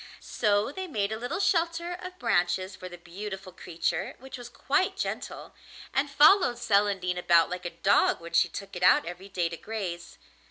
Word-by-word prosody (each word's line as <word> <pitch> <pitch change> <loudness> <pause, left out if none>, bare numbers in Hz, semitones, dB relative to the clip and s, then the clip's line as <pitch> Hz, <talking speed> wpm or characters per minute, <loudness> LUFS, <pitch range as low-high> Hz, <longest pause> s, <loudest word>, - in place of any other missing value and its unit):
So 210 +2 0
they 375 +5 -5
made 210 - -1
a 220 - -3
little 245 +9 -3
shelter 340 -3 +1
of 365 +1 -8
branches 185 - 0
for 185 0 -9
the 175 - -10
beautiful 190 +2 -8
creature 175 0 -3
which 265 +1 -10
was 245 -2 -9
quite 375 +8 0
gentle, - - -5 0.4
and 275 +2 +1
followed 295 -1 +5
Celandine 200 -5 +1
about 170 -1 +4
like 180 0 -5
a - - -1
dog 200 +1 +4
when 170 0 -10
she 170 +1 +4
took 195 +3 -8
it 180 - -6
out 180 - +5
every 175 +3 -8
day 175 -3 0
to 170 - -7
graze. 180 -6 -6
200 Hz, 185 wpm, -28 LUFS, 180-270 Hz, 0.4 s, followed